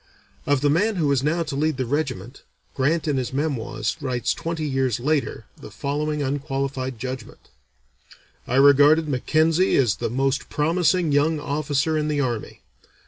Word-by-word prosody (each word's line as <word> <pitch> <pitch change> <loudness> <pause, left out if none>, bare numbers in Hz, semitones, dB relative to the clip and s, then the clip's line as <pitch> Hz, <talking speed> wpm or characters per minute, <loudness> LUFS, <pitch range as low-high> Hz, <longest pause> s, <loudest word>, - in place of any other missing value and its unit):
Of 145 -2 +2
the 145 - +3
man 205 +8 +1
who 165 -4 0
was 140 -2 +2
now 165 +4 0
to 150 -3 -5
lead 155 0 0
the 130 - -1
regiment, 130 -4 -3 0.3
Grant 155 +5 0
in 145 -3 +1
his 130 -2 -2
Memoirs 135 -1 -2
writes 125 -4 -1
twenty 165 -1 -4
years 130 -5 0
later 140 -4 -1
the - - -11
following 145 +6 -2
unqualified 135 -2 -3
judgment: 130 0 -7 1.0
"I 125 - -1
regarded 145 +3 +6
Mackenzie 155 +6 +2
as 120 -8 +2
the - - -2
most 135 +3 -1
promising 165 +1 +1
young 150 +2 +2
officer 145 +1 -1
in 150 - -1
the 150 -1 -1
army. 120 -5 -3
145 Hz, 155 wpm, -23 LUFS, 130-155 Hz, 1.0 s, regarded